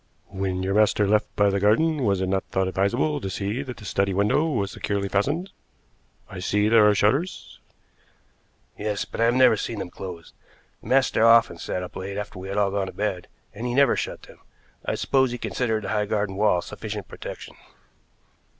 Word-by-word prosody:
"When 95 -1 -2
your 95 +1 -1
master 105 -1 +3
left 105 +1 +2
by 100 -1 +3
the 100 - 0
garden 140 +9 +2
was 100 -3 +1
it 95 - 0
not 95 0 0
thought 95 0 -1
advisable 120 +11 0
to 95 - -4
see 100 +6 -3
that 125 -5 -7
the 105 - -11
study 100 -1 0
window 105 +11 +2
was 100 -9 -1
securely 100 -1 -2
fastened? 145 - -1 0.8
I 95 - -8
see 105 +3 +1
there 110 -2 +6
are 105 - +3
shutters." 135 - 0 1.2
"Yes, 105 -1 -2
but - - -6
I - - +5
have 120 +1 +3
never 130 -3 +6
seen 110 +1 -4
them 90 - -5
closed. 90 -3 -9 0.5
The - - -13
master 130 -3 +3
often 115 -7 +5
sat 90 - -3
up 90 - -9
late 100 +1 -5
after 105 -3 -6
we 95 - -7
had 100 - -4
all 100 -1 +2
gone 100 -1 -1
to - - -8
bed, 100 -4 -3 0.3
and 115 +4 -5
he 120 - -2
never 140 -2 +4
shut - - -4
them. - - -15 0.4
I - - -2
suppose 130 -1 +2
he 125 - -4
considered 110 0 -2
the 95 - -4
high 105 -1 0
garden 100 -2 -1
wall 100 -4 +2
sufficient - - -6
protection." - - -9
105 Hz, 200 wpm, -24 LUFS, 95-115 Hz, 1.2 s, there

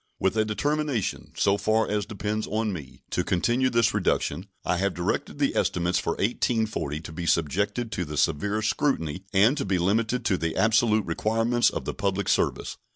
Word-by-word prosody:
With 95 +2 +1
a 110 - +3
determination, 145 +1 -1
so 100 0 +3
far 110 +2 +1
as 105 -1 -1
depends 105 0 -3
on 110 -1 -1
me, 75 -8 -9
to - - 0
continue 120 +8 +1
this 115 -2 +2
reduction, 90 +4 0 0.2
I 90 - +1
have 100 +1 0
directed 85 - -2
the - - +1
estimates 90 0 +1
for 85 - -1
1840 110 - -1
to 80 - -9
be 85 +1 -5
subjected 100 - 0
to 90 -3 -2
the 75 -1 -6
severest 100 +9 +1
scrutiny 95 - -1
and 105 +7 +4
to 140 - -1
be 95 -1 0
limited 110 +7 0
to 95 -4 +1
the 80 -1 -2
absolute 110 -1 +3
requirements 115 +7 +2
of - - -5
the - - -2
public 100 0 -1
service. - - 0
105 Hz, 180 wpm, -26 LUFS, 90-115 Hz, 0.2 s, and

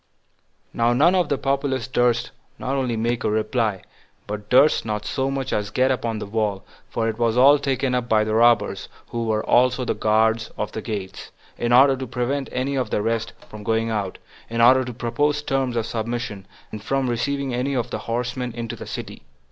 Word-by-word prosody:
3. - - -15
Now 120 +1 +4
none 155 +9 +4
of 180 -4 +2
the 140 - +1
populace 135 -2 -1
durst 120 -2 +1 0.3
not 135 +2 -2
only 125 -4 -1
make 120 +2 -1
a - - +1
reply, 110 -2 0 0.4
but 105 0 -6
durst 140 +4 +5
not 105 -1 -3
so 135 0 -1
much 135 -1 -3
as 105 -1 -1
get 130 +4 +2
upon 115 -3 -2
the - - -5
wall, 105 -2 -2 0.3
for 115 -1 -1
it 110 0 -3
was 115 0 +1
all 140 +3 +7
taken 135 -2 -1
up 125 -1 -1
by 110 -1 +4
the 110 0 -2
robbers, 120 +1 +3 0.2
who 115 -1 -3
were 110 -1 0
also 125 +1 +3
the - - 0
guard 110 +1 +2
at 105 - -3
the 110 - -5
gates, 105 -4 -6 0.3
in 120 - -2
order 135 +2 +6
to 130 0 -6
prevent 130 +3 -2
any 130 +2 -1
of 130 -2 -1
the 105 - -1
rest 115 0 -1
from 105 - -10
going 115 +1 0
out, 100 -4 -2 0.3
in 115 +1 -3
order 130 +3 +6
to 125 - -6
propose 145 +5 -1
terms 135 -4 -1
of 115 -2 0
submission, 115 -3 -4 0.2
and 105 -1 -7
from 135 +2 0
receiving 135 +2 -1
any 130 +3 -1
of 120 - -2
the - - -3
horsemen 125 +2 -3
into 115 -1 -5
the - - -9
city. - - -7
120 Hz, 205 wpm, -23 LUFS, 110-130 Hz, 0.4 s, all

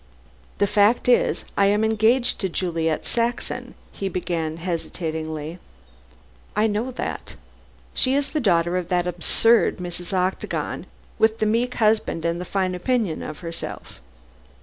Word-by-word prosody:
"The 205 - +3
fact 205 +5 +3
is, 245 - +3
I 200 - +4
am 205 +2 +3
engaged 220 +3 +3
to 190 - -1
Juliet 165 -3 -1
Saxon," 235 +1 -2 0.2
he 195 - -3
began, 165 -3 -2
hesitatingly. 160 -2 -4 1.0
"I 210 +1 +3
know 220 +3 0
that. 255 - -5 0.6
She 260 +1 +2
is 285 0 0
the 310 - 0
daughter 175 - +2
of 180 -2 -2
that 180 -1 +2
absurd 180 +6 +3
Mrs. 175 0 -6
Octagon, 185 0 -1 0.3
with 220 0 +4
the 215 - +1
meek 235 +3 +1
husband 215 -7 +1
and 170 +1 0
the - - -5
fine 185 0 0
opinion 200 -1 0
of 155 - -7
herself." 165 -1 -6
190 Hz, 140 wpm, -23 LUFS, 170-220 Hz, 1.0 s, I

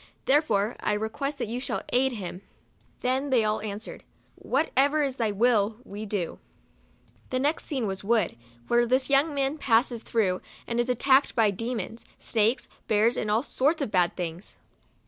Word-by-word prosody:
Therefore 235 -7 +2
I 210 - 0
request 250 +7 -3
that - - -3
you 235 +3 -3
shall 255 - -3
aid 260 +1 +2
him." 185 -4 -6 0.6
Then 265 +3 0
they 250 -4 +3
all 215 0 0
answered, 210 +1 -6 0.2
" - - -38
What 285 +5 -1
ever 285 +3 +4
is 270 -2 -2
thy 225 -3 +1
will, 215 0 +2
we 210 -2 -7
do." 195 -5 -3 0.9
The 255 - -1
next 290 +5 0
scene 265 -6 -2
was 190 -1 -3
a 195 - -12
wood, 220 -5 +2 0.3
where 240 0 +3
this 260 +3 +1
young 285 +3 +4
man 275 +2 -1
passes 235 -2 +2
through, 195 -7 0 0.2
and 235 0 -2
is 240 +1 +1
attacked 265 +3 +3
by 220 -3 +4
demons, 230 +2 -4
snakes, 225 +2 +1 0.2
bears, 220 +3 +3
and 215 - -2
all 220 +4 +2
sorts 295 +3 +1
of 225 - -4
bad 180 -2 +2
things. 175 +1 -6
235 Hz, 180 wpm, -27 LUFS, 210-265 Hz, 0.9 s, ever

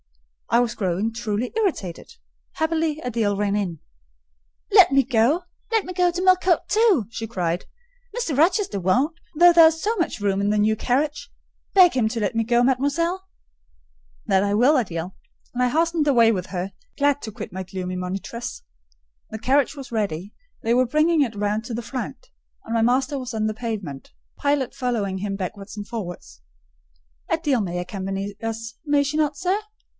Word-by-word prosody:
I 235 - +4
was 245 -1 +1
growing 195 +3 -1
truly 230 0 -3
irritated: 340 - -2 0.4
happily, 320 -1 0
Adèle 220 -4 0
ran 205 0 0
in. 180 -6 -2 0.9
"Let - - +7
me 275 0 +5
go,—let 340 - 0
me 365 - -6
go 355 -1 +2
to 355 +1 -3
Millcote 370 -1 +3
too!" 420 - +3
she 225 -1 -5
cried. 175 -5 -2 0.5
"Mr. 335 - -1
Rochester 340 - +2
won't: 255 - +1 0.2
though 350 +1 +8
there 335 -1 +9
is 320 0 0
so 445 +3 0
much 340 - -1
room 200 -1 0
in 200 - +1
the 210 - +2
new 215 +1 +3
carriage. 285 +5 -1 0.5
Beg 365 -3 +7
him 235 -4 +1
to 230 0 -3
let 210 +2 -1
me 225 - +2
go, 240 +1 +2
mademoiselle." 335 +9 0 1.0
"That 190 0 +3
I 200 0 0
will, 250 +7 +5
Adèle;" 185 - -1 0.4
and 250 0 0
I 250 - +3
hastened 325 +1 +1
away 235 -5 +5
with 185 -3 -3
her, 185 +1 -4 0.2
glad 285 0 +2
to 220 - -6
quit - - -8
my 190 - -4
gloomy 185 0 -5
monitress. 190 +6 -5 0.7
The 220 - -6
carriage 270 +5 +2
was 270 -4 -9
ready: 200 -3 -2 0.3
they 230 - +2
were 255 +1 +3
bringing 305 +4 +3
it 235 -6 0
round 205 +1 -1
to 235 - -4
the 235 - -3
front, 265 - -6 0.4
and 225 - -4
my 230 - +2
master 260 +4 +1
was 255 -1 -6
pacing 220 -2 -1
the 215 - 0
pavement, 210 - -5 0.2
Pilot 285 -3 0
following 210 -7 -2
him 195 0 -3
backwards 195 +2 -6
and 205 -1 -6
forwards. 175 - -7 0.9
"Adèle 290 -9 +1
may 175 -2 -3
accompany 195 +2 -4
us, 225 0 -4
may 290 -2 +2
she 285 +2 -3
not, 300 -2 +1
sir?" 370 +3 0
235 Hz, 175 wpm, -23 LUFS, 205-300 Hz, 1.0 s, there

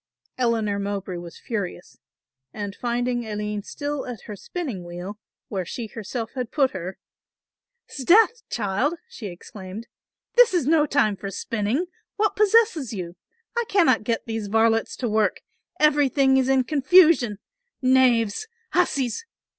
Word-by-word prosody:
Eleanor 225 -5 0
Mowbray 200 -2 -3
was 175 -1 -9
furious 200 -6 -5 0.5
and 205 +2 -5
finding 245 0 -1
Aline 210 -1 -3
still 285 +6 -4
at 245 -4 -6
her 210 - -8
spinning 250 - -5
wheel, 175 +4 -7 0.3
where 190 -3 -3
she 230 +7 -5
herself 225 +2 -5
had 250 -3 -3
put 275 -4 +2
her, 185 0 -6 0.9
"'Sdeath 430 - +4
child," 225 - 0
she 250 - -8
exclaimed, 190 +3 -9 0.5
"this - - +6
is 335 -7 +2
no 305 0 +4
time 270 -8 +2
for 195 0 -6
spinning, 220 - -1 0.3
what 430 0 +1
possesses 420 - +3
you? 175 -3 -5 0.4
I 475 - +1
cannot 330 - +4
get 230 +1 -1
those 225 -2 -3
varlets 225 +1 +2
to 245 - -2
work, 215 -1 +1 0.4
everything 280 -3 +4
is 260 0 +2
in 265 -1 +4
confusion, 285 - +5 0.4
knaves! 255 - +3 0.2
hussies! 280 - +1
235 Hz, 135 wpm, -24 LUFS, 205-285 Hz, 0.9 s, this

